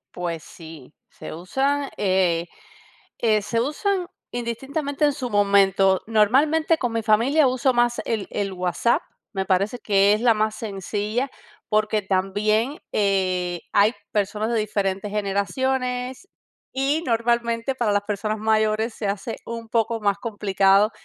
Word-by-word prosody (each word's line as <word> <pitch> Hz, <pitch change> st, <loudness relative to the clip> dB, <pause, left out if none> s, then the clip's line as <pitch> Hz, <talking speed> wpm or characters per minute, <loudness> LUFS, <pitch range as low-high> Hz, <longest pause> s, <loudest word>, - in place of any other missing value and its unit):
Pues 170 Hz, -3 st, -4 dB
sí. 160 Hz, -5 st, -12 dB, 0.2 s
Se -, -, -9 dB
usa, 270 Hz, -, -1 dB
eh 185 Hz, -4 st, +1 dB, 0.8 s
eh, 215 Hz, -2 st, +3 dB
se 230 Hz, +3 st, -1 dB
usan 360 Hz, +7 st, -1 dB, 0.2 s
indistintamente 275 Hz, +5 st, -3 dB
en 290 Hz, -, +3 dB
su 255 Hz, -3 st, -4 dB
momento. 195 Hz, -2 st, +3 dB
Normalmente, 285 Hz, +10 st, +3 dB
con 245 Hz, -5 st, -2 dB
mi 225 Hz, -1 st, -1 dB
familia 250 Hz, +8 st, +4 dB
uso 255 Hz, +1 st, +1 dB
más 240 Hz, 0 st, +2 dB
el 220 Hz, -3 st, -2 dB
el 200 Hz, -2 st, -2 dB
WhatsApp, 180 Hz, +6 st, +1 dB, 0.3 s
me 190 Hz, -1 st, -2 dB
parece 200 Hz, +6 st, 0 dB
que 200 Hz, -2 st, +3 dB
es 215 Hz, -, 0 dB
la 240 Hz, -1 st, +5 dB
más 215 Hz, 0 st, 0 dB
sencilla, 210 Hz, +4 st, -3 dB, 0.4 s
porque 215 Hz, 0 st, +1 dB
también, 205 Hz, +7 st, 0 dB
eh, 185 Hz, -3 st, 0 dB
hay 205 Hz, +3 st, +4 dB, 0.2 s
personas 210 Hz, +2 st, -1 dB
de 230 Hz, -, +2 dB
diferentes 200 Hz, -1 st, -2 dB
generaciones 250 Hz, -, -2 dB, 0.5 s
y 275 Hz, +4 st, +1 dB
normalmente 235 Hz, +1 st, 0 dB
para 235 Hz, -4 st, 0 dB
las 205 Hz, 0 st, +1 dB
personas 215 Hz, +1 st, -2 dB
mayores 220 Hz, +1 st, +1 dB
se 210 Hz, -, -4 dB
hace 200 Hz, +3 st, -3 dB
un 230 Hz, -1 st, -7 dB
poco 225 Hz, 0 st, 0 dB
más 200 Hz, -1 st, +1 dB
complicado 200 Hz, -1 st, +2 dB
215 Hz, 135 wpm, -23 LUFS, 200-240 Hz, 0.8 s, la